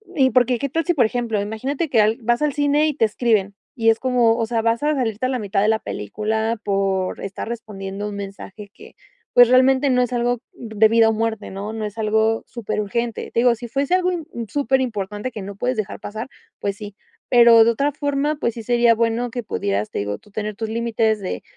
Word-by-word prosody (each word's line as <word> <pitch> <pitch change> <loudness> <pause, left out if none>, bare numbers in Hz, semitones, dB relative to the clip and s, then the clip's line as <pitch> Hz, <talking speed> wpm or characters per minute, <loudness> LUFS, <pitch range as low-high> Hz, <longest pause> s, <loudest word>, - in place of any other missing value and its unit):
y 265 -3 +4
porque, 250 -1 +3
¿qué 280 - -1
tal 325 +4 -2
si 350 - +2
por 250 -7 +3
ejemplo, 225 -2 -1
imagínate 260 +10 -3
que 230 -5 +4
al 215 +2 +2
vas 240 +3 +1
al 300 -1 +2
cine 290 +1 +2
y 300 - 0
te 230 -5 +2
escriben, 210 -3 0 0.2
y 225 -3 +2
es 225 - +3
como, 245 -3 +3
o 230 - 0
sea, 225 0 -1
vas 230 +3 0
a 300 +1 +2
salirte 230 -3 -1
a - - -3
la 255 -1 -1
mitad 200 -2 -1
de 210 - +3
la 220 0 +2
película, 220 - -3
por 195 -2 -1
estar 200 +2 -6
respondiendo 205 -3 -6
un 205 - -7
mensaje 200 +1 -8
que, - - -15 0.4
pues 245 0 +8
realmente 260 +2 +4
no 250 -1 +3
es 245 0 -1
algo 245 0 0
de 220 -2 +2
vida 225 0 +5
o 225 - +2
muerte, 220 -1 -2
no? 200 +2 -5
No 220 -1 -4
es 210 +1 -7
algo 220 +1 +1
súper 225 -3 -3
urgente. 235 +3 -3
Te - - 0
digo, 245 -1 +4
sí 240 +1 -8
fuese 275 +7 -1
algo 365 0 +1
im 335 -3 -4 0.2
súper 270 -1 +1
importante, 210 0 -3
que 220 - -7
no 200 0 -7
puedes 250 +3 -2
dejar 215 -2 -4
pasar, 220 +4 -6 0.3
pues 200 -1 -2
sí. 205 -1 -9 0.3
Pero 235 -2 +7
de 225 - +3
otra 280 +5 0
forma 285 +1 -1
pues, 235 -6 -2
sí 230 - -7
sería 235 0 +3
bueno 230 +2 0
que 245 -1 -4
pudieras, 100 - -2
te - - -3
digo, 100 0 -3
tú 210 - -23
tener 210 0 -4
tus 220 0 -4
límites 225 -1 0
de 190 - -5
225 Hz, 230 wpm, -21 LUFS, 210-250 Hz, 0.4 s, pues